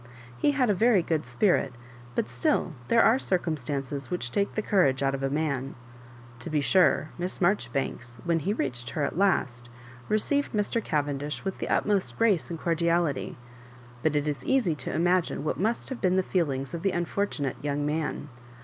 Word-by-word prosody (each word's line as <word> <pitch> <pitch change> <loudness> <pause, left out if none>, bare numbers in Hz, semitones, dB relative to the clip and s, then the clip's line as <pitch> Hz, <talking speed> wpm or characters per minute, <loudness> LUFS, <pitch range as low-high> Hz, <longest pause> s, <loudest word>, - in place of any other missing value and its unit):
He 205 - +2
had 265 -3 +2
a 210 - +3
very 215 -2 +4
good 160 -6 -1
spirit, 130 - +1 0.4
but - - 0
still 120 +7 0
there 230 0 +5
are 235 +4 +5
circumstances 145 - -2
which 150 -10 -3
take 200 0 0
the 215 - -1
courage 140 -11 +2
out 135 0 +2
of 135 - -3
a 135 - 0
man. 140 -3 -2 0.6
To 120 - -5
be 155 -1 +1
sure, 155 -1 +3
Miss 180 +1 -3
Maijoribanks, 135 - -1
when 170 -1 +2
he 185 +6 -1
reached 125 - -3
her 150 - -2
at 140 - -1
last, 130 -11 +1 0.4
received 280 +7 +1
Mr. 210 +2 0
Cavendish 145 +1 -2
with 195 - -3
the - - -3
utmost 205 -2 +1
grace 210 -7 +2
and 165 -2 -5
cordiality; 170 -3 0 0.6
but 155 +1 +1
it 145 0 +1
is 140 -4 -2
easy 250 -11 +2
to 140 -4 -5
imagine 175 -2 +1
what 155 - -2
must 220 +5 -1
have 260 - -6
been 185 -1 +3
the 190 - +3
feelings 140 -8 -1
of 170 - -4
the 195 0 +1
unfortu 175 0 -1
nate 135 -1 -3
young 145 0 -1
man. 150 -1 -2
160 Hz, 185 wpm, -27 LUFS, 140-195 Hz, 0.6 s, there